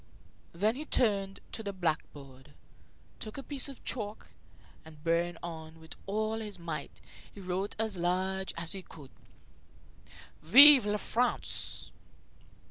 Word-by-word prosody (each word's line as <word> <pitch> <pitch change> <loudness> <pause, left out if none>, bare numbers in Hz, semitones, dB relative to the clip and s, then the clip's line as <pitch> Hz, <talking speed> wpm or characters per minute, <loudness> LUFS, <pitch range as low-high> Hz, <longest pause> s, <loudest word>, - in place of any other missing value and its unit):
Then 205 +6 +1
he 280 +5 -6
turned 200 -8 0
to - - -4
the 200 -2 -4
blackboard, 145 -5 -5 0.6
took 215 +3 -8
a 275 - -6
piece 280 -1 -1
of 275 - -12
chalk, 215 -3 -3 0.5
and, 155 -1 -15
bearing 170 +1 0
on 160 -1 -8
with 160 0 -12
all 215 +2 -1
his 210 -3 -6
might, 165 -4 -6 0.3
he - - -13
wrote 190 +1 -3
as 220 -3 -2
large 185 +2 -1
as 170 -1 -3
he 195 - -3
could: 150 -6 -13 1.3
"Vive 265 - +9
La 210 0 0
France!" 245 +4 -1
190 Hz, 130 wpm, -30 LUFS, 165-215 Hz, 1.3 s, Vive